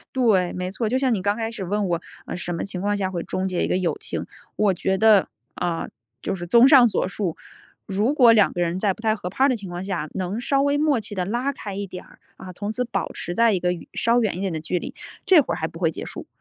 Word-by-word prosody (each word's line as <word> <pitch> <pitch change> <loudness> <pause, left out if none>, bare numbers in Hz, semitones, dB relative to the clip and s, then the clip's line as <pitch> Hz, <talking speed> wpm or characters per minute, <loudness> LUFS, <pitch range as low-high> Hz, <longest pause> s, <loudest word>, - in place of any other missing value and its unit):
对， 210 -9 +3
没 180 0 -4
错， 220 +2 -1
就 255 +4 +1
像 260 -2 +1
你 200 - 0
刚 205 +3 0
开 225 -1 -2
始 225 -4 -5
问 205 +2 -1
我： 170 -1 0 0.3
“呃， - - -4
什 175 0 -3
么 - - -3
情 190 -2 -5
况 205 +1 0
下 190 -2 -1
会 175 -2 -3
终 185 0 -3
结 185 -2 -1
一 - - -1
个 - - +1
友 175 -5 0
情？” - - -4 0.3
我 205 -3 +3
觉 190 +2 0
得， 215 -2 +5 0.3
啊， 175 -2 -2 0.3
就 195 - -2
是 175 -2 -6
综 235 +7 +6
上 265 -4 +8
所 210 - 0
述， 190 -4 -3 0.5
如 210 +8 0
果 245 -5 +7
2 215 -3 +4
个 175 - -1
人 170 +1 -1
在 200 -3 +2
不 225 - -15
太 220 -1 +2
合 180 -4 -5
拍 260 +9 +1
儿 - - +5
的 255 - +1
情 200 -3 -8
况 175 +1 -5
下， 170 -6 -3
能 190 +4 -3
稍 275 +2 +1
微 285 0 +2
默 295 -4 +2
契 210 -1 -5
地 185 -2 -1
拉 240 +7 -1
开 205 -7 -7
一 200 0 -4
点 180 - -9
儿， - - -20 0.2
啊， 185 -1 -9
从 205 +4 -4
此 250 +2 -1
保 235 - -3
持 175 - -5
在 230 +1 +4
一 185 - 0
个 180 0 +1
远 175 - -8
稍 235 +1 +2
远 205 -5 0
一 - - -4
点 195 -2 -1
的 160 - -3
距 180 +3 -1
离， - - -7 0.3
这 370 -5 +7
会 275 - -2
儿 - - -5
还 160 - -2
不 165 - -11
会 165 -2 +2
结 - - -6
束。 - - -8
200 Hz, 305 characters per minute, -23 LUFS, 180-230 Hz, 0.5 s, 上